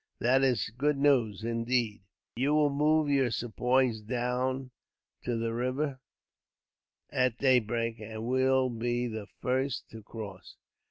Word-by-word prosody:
That 130 +3 +3
is 120 -7 +1
good 150 +1 +2
news, 120 -8 +2
indeed!" 115 -1 -1 0.3
"You 140 +5 +1
will 150 -1 +3
move 150 +2 +2
your 135 -3 +2
Sepoys 120 0 +1
down 125 +3 -2 0.5
to 120 -2 -2
the 115 0 -2
river 130 +3 -2 1.1
at 125 -2 +1
daybreak, 120 -3 +1
and 110 +1 -6
will 130 +1 +2
be 120 +1 -1
the 110 -3 -5 0.2
first 130 0 -1
to 115 - -9
cross. 105 -3 -9
125 Hz, 125 wpm, -30 LUFS, 115-130 Hz, 1.1 s, That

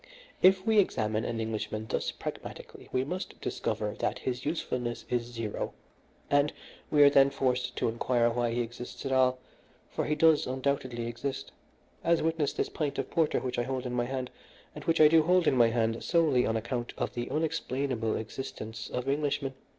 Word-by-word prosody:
If 190 +1 +5
we 220 -2 +5
examine 110 - +1
an 115 -1 -2
Englishman 110 -1 -3
thus - - -1
pragmatically - - -8
we 130 - +1
must 180 +7 -5
discover - - -2
that - - 0
his 125 -1 -3
usefulness 125 -6 -2
is 120 -1 +2
zero, 115 -3 -4 0.5
and 145 +1 +3 0.4
we 145 -1 +6
are 140 - +9
then 140 -1 +6
forced 125 -2 -1
to - - 0
inquire 120 +1 +1
why 120 0 0
he 120 +1 0
exists 120 +3 -7
at 135 - -2
all, 130 -1 +4 0.5
for - - -2
he 150 - +1
does 160 0 +4
undoubtedly 130 -2 -1
exist, 130 +4 -4 0.5
as 170 -1 +3
witness 160 -2 +1
this - - -1
pint 145 -3 -3
of 135 - -3
porter 165 -3 +2
which 125 -2 -2
I - - +1
hold 130 0 -3
in 125 - -3
my 120 -1 +1
hand, 130 0 -4 0.4
and - - -8
which 165 0 +2
I 155 - +9
do 160 +1 +6
hold 180 +2 +3
in 135 - +3
my 120 -2 +6
hand 115 0 0
solely 150 -7 +3
on 115 - +1
account 120 +1 -3
of - - -2
the 120 0 -4
unexplainable 135 -7 -1
existence 110 -1 -6
of 125 +1 -3
Englishmen. 140 -1 0
130 Hz, 185 wpm, -29 LUFS, 120-150 Hz, 0.5 s, are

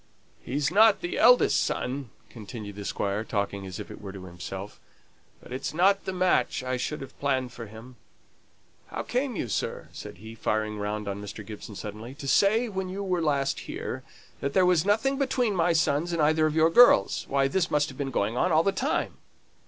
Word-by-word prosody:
"He's 140 +4 -1
not 215 +2 +5
the 350 +2 -3
eldest - - +6
son," 130 0 -3 0.2
continued 105 -2 -8
the 100 0 -7
Squire, 100 +2 -1
talking 100 -3 -3
as 95 - -7
it - - -8
were 100 -2 -7
to 95 -1 -9
himself. 95 +3 -8 0.6
"But - - -9
it's 130 +4 -4
not 195 +3 +3
the - - -2
match 180 -10 +1
I 130 0 -1
should 140 +4 -3
have 135 - -10
planned 130 -3 0
for 115 -2 -8
him. 115 +4 -12 0.9
How - - -5
came 250 0 -1
you, 125 - -2
sir," 105 - -3
said - - -9
he, 110 +4 -10
firing 110 -1 -1
round 105 0 -3
on 100 0 -4
Mr. 105 +1 -8
Gibson, 105 0 -9
suddenly 110 +6 -7
"to 140 - -8
say 215 - +4
when 190 -3 -4
you 195 +2 -4
were 180 -3 0
last 140 -3 0
here, - - -4 0.4
that 140 0 -2
there 185 - +4
was 180 -2 +3
nothing 225 +7 +2
between 260 -5 +1
my 175 0 +3
sons 160 +1 +1
and 170 - -1
either 155 +1 +3
of 155 - -3
your 160 +1 +4
girls? 205 - +5
Why, 135 0 +2
this 180 +5 0
must 150 +1 +1
have 130 - -11
been 140 -1 -1
going 110 -3 -1
on 180 +8 +1
all 160 +1 +4
the 195 - +2
time!" 250 +10 -1
140 Hz, 200 wpm, -27 LUFS, -, 0.9 s, eldest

